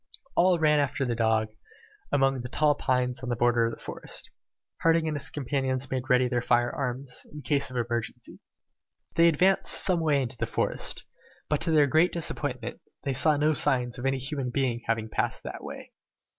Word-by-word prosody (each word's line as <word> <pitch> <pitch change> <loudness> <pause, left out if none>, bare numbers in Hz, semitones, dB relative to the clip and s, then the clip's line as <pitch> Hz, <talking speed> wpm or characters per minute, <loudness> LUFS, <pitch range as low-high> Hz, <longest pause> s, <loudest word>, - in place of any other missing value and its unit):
All 180 0 +4
ran 150 -2 +3
after 140 -1 0
the 120 - -1
dog, 110 -1 +1 0.6
among 135 -2 +2
the 125 - -5
tall 150 +2 +3
pines 125 -3 -1
on 125 - -5
the 120 - 0
border 120 0 +2
of 115 - -4
the - - -22
forest. - - -6 0.5
Harding 165 -1 +3
and 155 - -1
his 145 - -3
companions 135 -2 -2
made 130 0 -3
ready 125 -1 +4
their 120 0 0
fire 120 0 +2
arms, 130 -1 -4
in 150 -1 -9
case 140 -3 +1
of 130 - -10
an 120 -1 0
emergency. 120 -1 -5 0.8
They 170 0 +6
advanced 185 +4 +3
some 180 -3 +2
way 150 -4 +2
into 120 -1 -6
the - - -3
wood, - - 0 0.5
but 150 - 0
to 170 - +1
their 150 -2 +5
great 160 +6 +3
disappointment, 170 -2 -2 0.2
they 140 - -1
as 130 - +2
yet - - +8
saw 155 0 +5
no 150 +2 +2
signs 125 -4 +1
of 130 - -1
any 135 0 +1
human 135 0 -3
being 125 -2 -1
having 115 -1 0
passed - - -2
that - - -7
way. - - -9
135 Hz, 200 wpm, -27 LUFS, 125-150 Hz, 0.8 s, yet